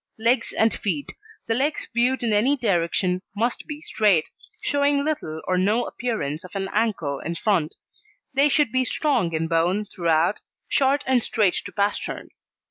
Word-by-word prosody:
LEGS 230 +2 +1
AND 220 0 +2
FEET 280 +8 -3 0.3
The 225 - 0
Legs 280 +6 0
viewed 245 +2 +2
in 225 -2 +1
any 250 +8 +3
direction 180 -4 0
must 235 +4 -1
be 300 -1 -6
straight, 205 - +2 0.3
showing 285 0 +2
little 160 - -3
or 185 0 +2
no 210 +6 +2
appearance 165 - -3
of 180 +1 -12
an 195 -1 -2
ankle 195 -11 0
in 170 +2 -4
front. 175 -4 0 0.6
They 280 +2 +4
should 290 -4 +2
be 260 +1 +2
strong 250 - 0
in 160 0 -1
bone 175 +5 +1
throughout, 170 0 +1 0.3
short 275 0 +2
and 260 -2 +3
straight 210 -5 +1
to - - -7
pastern. 200 0 -2
215 Hz, 160 wpm, -24 LUFS, 180-260 Hz, 0.6 s, They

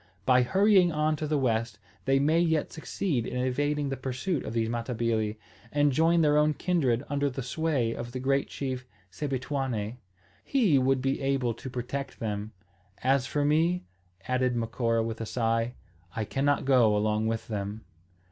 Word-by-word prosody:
By 125 -1 +5
hurrying 190 - +4
on 155 0 +1
to 155 - -3
the 150 0 +1
west, 115 -4 0 0.3
they 135 0 +3
may 155 +4 +3
yet 160 -3 +1
succeed 155 - -2
in - - -4
evading 145 +3 0
the 135 - -2
pursuit 130 +6 -2
of - - -5
these 115 -1 +1
Matabili, 115 -2 -1 0.3
and 145 0 +3
join 165 +4 +3
their 150 -1 +4
own 150 0 +3
kindred 140 -9 +1
under 145 0 0
the 135 0 -5
sway 135 -4 0
of 120 +1 -6
the 130 - -4
great 135 +2 +1
chief 130 -2 -4 0.2
Sebituane. 130 -2 -3 0.5
He 215 - +3
would 130 0 +2
be 135 +1 0
able 135 -3 +1
to 130 +4 -8
protect 130 +2 -5
them. 105 -1 -3 0.5
As 135 0 +2
for 145 +1 0
me," 165 +5 +2 0.4
added 130 -1 +1
Macora 115 0 0
with 115 0 -4
a 115 - -4
sigh, 115 +1 0 0.4
"I 110 - -1
cannot 140 +4 0
go 120 -6 +4
along 105 +1 +1
with 115 -1 -2
them." 105 0 -4
130 Hz, 165 wpm, -28 LUFS, 115-145 Hz, 0.5 s, By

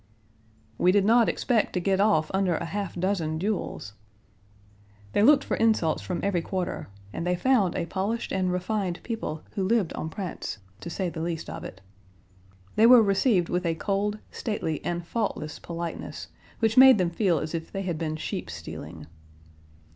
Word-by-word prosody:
"We 180 - +5
did 200 0 +3
not 230 +1 +5
expect 235 -4 +1
to 180 - 0
get 190 +1 +1
off 160 -7 +3
under 190 -3 +2
a - - -3
half 200 +1 -4
dozen 175 -4 -1
duels." 180 - -3 1.2
They - - +3
looked 275 +6 +6
for - - -1
insults 215 -8 +2
from 180 - -3
every 195 -4 +1
quarter 185 +1 -3 0.3
and - - -3
they 180 +1 +1
found 205 -3 +2
a - - -1
polished 200 +7 -2
and 185 -1 0
refined 180 0 -2
people 220 -10 -4
who 195 - -2
lived 200 -3 +1
en 160 - -4
prince, 180 - -5 0.2
to - - -7
say 180 +1 -2
the 160 - -6
least 165 -1 -3
of - - -7
it. 95 - -9 1.0
They 220 +2 +7
were 245 -2 +9
received 195 -2 +2
with 180 +1 0
a 165 -2 0
cold, 205 +4 -1
stately, 180 - -3
and 175 0 -3
faultless 170 -7 -3
politeness, 170 -1 -6 0.3
which 225 0 +1
made 260 -2 +9
them 180 -3 +1
feel 175 -2 +2
as 155 +2 -4
if 165 -1 -4
they 195 - -3
had 175 -4 -3
been 155 -2 -2
sheep 90 - -4
stealing. 80 -1 -8
185 Hz, 175 wpm, -26 LUFS, 165-210 Hz, 1.2 s, were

